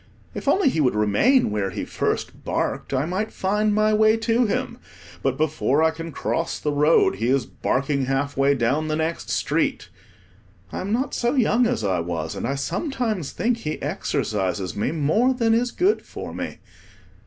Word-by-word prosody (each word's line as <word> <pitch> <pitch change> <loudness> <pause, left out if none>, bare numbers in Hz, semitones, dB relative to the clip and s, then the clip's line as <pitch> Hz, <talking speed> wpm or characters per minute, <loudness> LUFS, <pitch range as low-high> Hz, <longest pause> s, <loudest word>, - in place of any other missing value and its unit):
If - - -7
only 380 -7 +4
he 160 - 0
would 125 -6 +2
remain 105 - +3
where 105 -2 -1
he - - -4
first - - -3
barked, - - -2
I 135 +1 +1
might 190 +6 -2
find 210 +3 0
my 215 +1 +3
way 215 +1 +4
to 230 +1 +2
him; - - -2 0.4
but, 135 -1 0
before 155 -1 +1
I 160 - +4
can 165 +1 -7
cross 165 +2 -2
the 150 - -2
road, 150 +3 +3
he 115 - -1
is 130 -1 +2
barking 140 +1 -1
half 135 +2 -1
way 140 +1 +3
down 135 +6 0
the 155 - 0
next 160 +1 -2
street. - - -1 0.8
I - - -4
am 195 +2 -4
not 255 +4 0
so 240 +3 0
young 240 -1 +3
as 115 - -1
I 95 -3 +1
was 85 -2 -3
and - - -3
I 135 - -1
sometimes 215 - -2
think 235 0 0
he 155 -9 -4
exercises 95 -2 -2
me 105 - -1
more 210 - +2
than 230 -2 +2
is 240 +2 +2
good 375 - +1
for - - -8
me. - - -5
160 Hz, 185 wpm, -23 LUFS, 135-225 Hz, 0.8 s, only